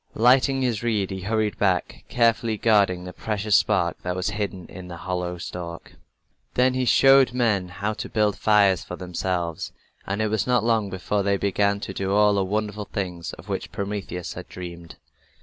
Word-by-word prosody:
Lighting 130 +3 +4
his 120 -5 0
reed, 110 -5 0
he 95 -1 -5
hurried 110 +2 -1
back, 95 -3 0
carefully 115 -2 +2
guarding 100 -5 +3
the 90 0 -8
precious 105 -1 0
spark 90 -7 +2
that 90 0 -3
was 95 +2 -1
hidden 100 -3 -4
in 90 -1 -10
the 85 -1 -8
hollow 90 0 -3
stalk. 85 -1 -7 0.6
Then 125 +1 +3
he 130 0 0
showed 135 +2 +6
men 110 -7 +1
how 100 +3 -3
to 110 - -6
build 105 -2 +1
fires 100 -4 +3
for 90 - -7
themselves, 90 -2 -3 0.4
and 95 +2 -2
it 110 -1 +1
was 110 +1 0
not 125 -3 +3
long 110 -3 +1
before 95 +2 -1
they 100 0 +1
began 100 +1 +1
to - - -5
do 95 0 -2
all 105 0 +5
the 100 -1 +1
wonderful 105 +1 -2
things 90 -5 -4
of - - -12
which - - -4
Prometheus 100 -3 -4
had - - -9
dreamed. 85 -2 -9
100 Hz, 185 wpm, -24 LUFS, 90-110 Hz, 0.6 s, showed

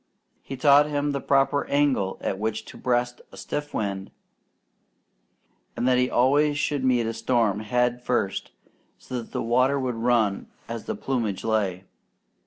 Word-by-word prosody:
He 135 - -7
taught 145 +2 +6
him 145 0 0
the 140 -1 -3
proper 140 +1 +2
angle 140 -10 +1
at 95 - -2
which 110 0 -2
to - - -12
breast 120 0 -1
a - - -13
stiff 145 0 -4
wind, 100 -2 -3 1.7
and 125 - 0
that 125 -1 +4
he 125 0 +2
always 145 +4 +3
should 145 -2 -1
meet 125 -3 +2
a 115 - -2
storm 115 -5 +1
head 125 +3 0
first, 120 -6 -1 0.5
so 125 -1 -5
that 115 - -14
the - - -2
water 130 +4 +2
would 130 -2 -1
run 115 -3 +1 0.2
as 115 -1 -6
the - - -3
plumage 115 -7 -2
lay. 100 -5 0
125 Hz, 160 wpm, -25 LUFS, 110-135 Hz, 1.7 s, taught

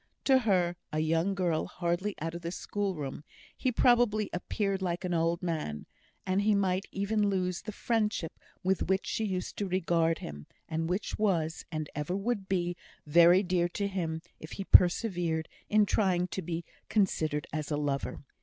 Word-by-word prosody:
To 265 -1 +6
her, 180 -7 +1
a 155 - -2
young 165 +5 +1
girl 175 -4 0
hardly 180 +3 -2
out 165 +2 -3
of 170 - -6
the 170 - -3
schoolroom, 180 -8 -3 0.3
he 255 - 0
probably 235 -4 +3
appeared 195 +2 -1
like 180 0 -2
an 180 - -1
old 165 +1 +1
man; 155 - -3 0.4
and 185 +2 +1
he 210 0 +3
might 190 -1 +1
even 205 +1 +1
lose 185 -2 -1
the 215 - -6
friendship 210 -6 -1 0.2
with 190 0 0
which 190 0 +2
she 220 - -1
used 185 -3 -3
to 200 - -1
regard 170 -3 +1
him, 75 0 -8 0.2
and 165 +1 -2
which 185 +4 -2
was, 170 -6 0
and 155 -2 -3
ever 150 +6 -2
would 200 -1 -2
be, 175 -2 0 0.3
very 170 +5 +6
dear 175 -2 +1
to 200 +3 -2
him, 165 -4 -3 0.2
if 155 - -9
he 195 - -4
persevered 175 -4 +4 0.2
in 210 0 +5
trying 185 -4 +2
to 190 - -3
be 170 0 -4 0.2
considered 155 -8 +1
as 155 -1 -3
a 150 - 0
lover. 145 -2 -2
180 Hz, 175 wpm, -30 LUFS, 165-200 Hz, 0.4 s, To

